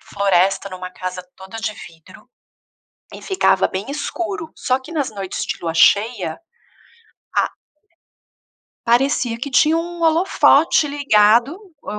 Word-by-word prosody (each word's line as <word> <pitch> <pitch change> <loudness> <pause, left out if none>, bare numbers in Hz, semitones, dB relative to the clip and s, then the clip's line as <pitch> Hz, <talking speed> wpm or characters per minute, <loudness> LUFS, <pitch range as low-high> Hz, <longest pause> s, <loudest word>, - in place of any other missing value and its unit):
floresta, 195 0 0
numa 185 0 -8
casa 185 0 -6
toda 190 +4 -10
de 215 -1 -3
vidro, 160 -1 -15 0.8
e - - -11
ficava 385 -1 +2
bem 195 +7 -5
escuro, 325 +3 -5
só 255 +1 0
que 265 +6 -12
nas 290 -5 -1
noites 195 -2 -5
de 220 -2 -4
lua 165 -1 -2
cheia, 200 -1 +2 1.0
a - - +1 1.4
parecia 245 -1 +2
que 255 +5 -6
tinha 310 +5 +3
um 345 +1 -5
holofote 325 -2 +3
ligado, 255 - +3 0.2
eu 210 - -6
235 Hz, 125 wpm, -19 LUFS, 195-300 Hz, 1.4 s, tinha